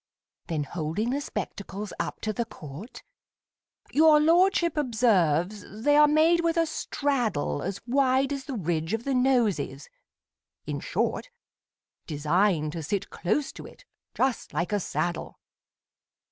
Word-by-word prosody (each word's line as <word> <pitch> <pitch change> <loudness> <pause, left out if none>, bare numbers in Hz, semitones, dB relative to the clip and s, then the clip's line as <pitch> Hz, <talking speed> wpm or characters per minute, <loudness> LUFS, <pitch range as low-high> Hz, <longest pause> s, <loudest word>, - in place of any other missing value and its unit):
Then 155 -3 -1
holding 170 - -2
the 280 +2 -1
spectacles 200 -6 -5
up - - -4
to 215 - -2
the 235 +3 -2
court 160 - -10 0.9
Your 310 0 +6
lordship 340 +1 +3
observes 210 - +2 0.2
they 290 +2 +4
are 300 0 +7
made 315 +3 +4
with 335 0 0
a 330 - +4
straddle 270 - -1
As 195 +3 -5
wide 265 +2 +2
as 275 -1 -5
the 275 - -5
ridge 165 0 -1
of 225 - -6
the 275 - -1
Nose 250 -5 +3
is; 485 - -6 0.8
in - - -3
short, - - -2 0.8
Designed 155 +1 +1
to 165 - -5
sit 190 +6 -3
close 270 +11 -1
to - - -10
it, - - -17 0.3
just 260 -3 -1
like 175 - -1
a 205 - +2
saddle. 175 -2 -3
230 Hz, 140 wpm, -27 LUFS, 175-285 Hz, 0.9 s, are